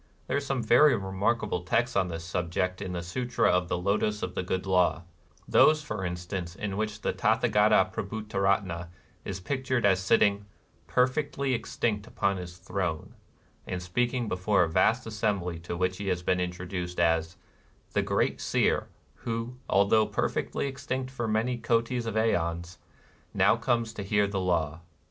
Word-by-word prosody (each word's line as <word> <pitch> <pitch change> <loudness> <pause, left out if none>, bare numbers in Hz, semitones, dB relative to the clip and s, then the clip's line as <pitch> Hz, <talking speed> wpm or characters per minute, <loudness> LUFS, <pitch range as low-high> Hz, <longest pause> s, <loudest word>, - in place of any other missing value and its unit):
There - - -2
are - - +3
some 135 -3 -2
very 130 +7 +6
remark 100 +5 0
able 100 -4 -2
texts 115 +7 0
on 95 -2 +2
this 85 -1 -5
subject 90 +2 -2
in 95 -2 -4
the 85 -1 -3
Sutra 120 +8 0
of 90 0 +1
the 90 - -1
Lotos 105 +3 0
of 90 - -3
the - - -2
Good 95 +1 -2
Law: 90 -2 +2 0.4
those 155 0 +5
for 105 -8 -4
instance 90 0 -4
in 100 0 -4
which 105 0 -3
the - - -1
Tathagata 105 -3 +3
Prabhutaratna 100 -4 -1 0.4
is 95 -1 -5
pic 130 +8 -3
tured 130 -4 +1
as 95 -2 +4
sitting 100 +1 +2 0.4
'^perfectly 135 +1 +1
extinct 110 -2 -2
upon 100 -5 0
his 90 -1 -8
throne,''^ 90 -3 -3 0.6
and 90 - -3
speaking 120 +7 -1
before 95 +1 +2
a - - +1
vast 110 +9 +2
assembly 100 -6 -1
to 85 +1 -5
which 90 +1 0
he 100 0 -5
has 90 -2 -1
been 90 0 +1
introduced 90 0 -4
as 80 0 +1 0.3
" - - -34
the - - +2
great - - 0
Seer - - +1 0.3
who, 115 +2 -4
although 100 +3 +4
perfectly - - -1
extinct 130 -1 -4
for 120 -3 -3
many 115 +3 0
hbtis 115 +1 0
of 110 - -3
ceons, 85 -5 0 0.6
now - - +5
comes 115 -2 0
to 105 - -6
hear 105 +1 +2
the 100 -1 -2
Law." 85 -4 0
100 Hz, 165 wpm, -28 LUFS, 90-115 Hz, 0.6 s, very